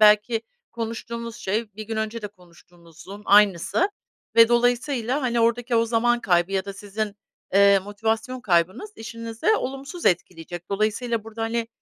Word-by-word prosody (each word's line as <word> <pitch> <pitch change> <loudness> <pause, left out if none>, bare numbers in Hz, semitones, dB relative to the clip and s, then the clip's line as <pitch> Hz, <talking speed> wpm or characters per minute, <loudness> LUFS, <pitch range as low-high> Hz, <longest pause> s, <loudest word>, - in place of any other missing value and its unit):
belki 215 +2 +5 0.3
konuştuğunuz 230 0 -5
şey 210 +2 -2
bir 215 - -6
gün 225 - -4
önce 220 +1 -2
konuştuğunuzun 175 -1 -13
aynısı 205 - +4 0.5
ve 230 0 +8
dolayısıyla, 245 +2 +1
hani, 240 -2 +1
oradaki 235 +1 +2
o 230 - +4
zaman 240 +1 +2
kaybı 175 -3 +2
ya 190 -1 0
da 200 - -6
sizin, 205 +1 -5 0.4
eee, 200 0 +7
motivasyon 220 +6 -2
kaybınız 185 - +1
işinizi 230 +4 -7
olumsuz 275 +6 -5
etkileyecek. 175 0 -1
Dolayısıyla 215 +2 -1
burada, 225 0 -6
hani, 230 0 -1
220 Hz, 135 wpm, -24 LUFS, 200-235 Hz, 0.5 s, ve